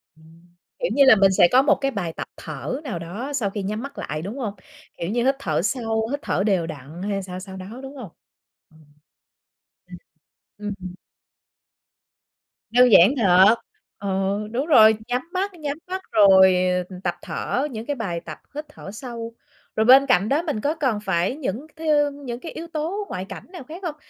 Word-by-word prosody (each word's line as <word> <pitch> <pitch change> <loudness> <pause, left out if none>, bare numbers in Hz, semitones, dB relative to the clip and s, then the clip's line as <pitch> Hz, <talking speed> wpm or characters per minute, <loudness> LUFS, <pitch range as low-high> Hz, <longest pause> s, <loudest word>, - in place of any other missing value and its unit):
Ừm, 165 +2 -21 0.2
kiểu - - -1
như 280 - +5
là, 255 -4 +8
mình 195 -1 +4
sẽ 180 - +6
có 255 - +6
một 275 - +4
cái 275 0 -2
bài 180 -8 -3
tập - - -6
thở 260 - -5
nào 250 - -4
đó 205 - -6
sau 235 -8 0
khi 200 0 -5
nhắm 215 +4 -3
mắt 280 +1 -8
lại, 150 +1 -4
đúng 205 +9 -6
hông? 220 -6 -3 0.4
Kiểu 170 - -3
như, 240 +2 0
hít 270 +1 +3
thở 155 - -1
sâu, 225 +1 -1
hít 285 - -2
thở 195 - -1
đều 185 -6 +1
đặn 155 +3 -9
hay 200 -1 -2
sao 185 0 -7
sao 190 0 -9
đó, 205 +7 -9
đúng 270 +1 -9
không? 220 -10 -8 1.8
Ừm. - - -10 0.6
Ừm, 210 -1 -4
ừm. 180 0 -7 1.8
Đơn 250 0 +5
giản 195 +4 +7
thật, 195 0 +6 0.4
ừ, 200 - -5 0.4
đúng 260 +5 -1
rồi, 220 -8 +7
nhắm 250 +1 0
mắt 385 +2 -1
nhắm 295 -4 -4
mắt 375 +1 -4
rồi, 190 -3 +7 0.3
ờ, 185 - -9
tập 175 - -1
thở 270 +4 -2
những 220 -1 -6
cái 290 +1 -2
bài 185 -8 -3
tập - - -7 0.2
hít 300 +1 -5
thở 245 -9 -10
sâu. 230 0 -7 0.4
Rồi 220 - +2
bên 265 +3 +8
cạnh 215 -6 +2
đó 290 +4 +2
mình 300 -11 -3
có 295 +6 0
cần 260 -9 0
phải 190 +2 0
những 275 -1 -4
cái 320 0 -6
thứ 290 -1 +4
những 270 -4 -7
cái 330 - -8
yếu 330 +1 -7
tố 335 +6 -3
ngoại 185 +1 -4
cảnh - - -8
nào 355 -6 -9
khác 325 +8 -10
không? 330 -5 -4
230 Hz, 200 wpm, -23 LUFS, 190-280 Hz, 1.8 s, là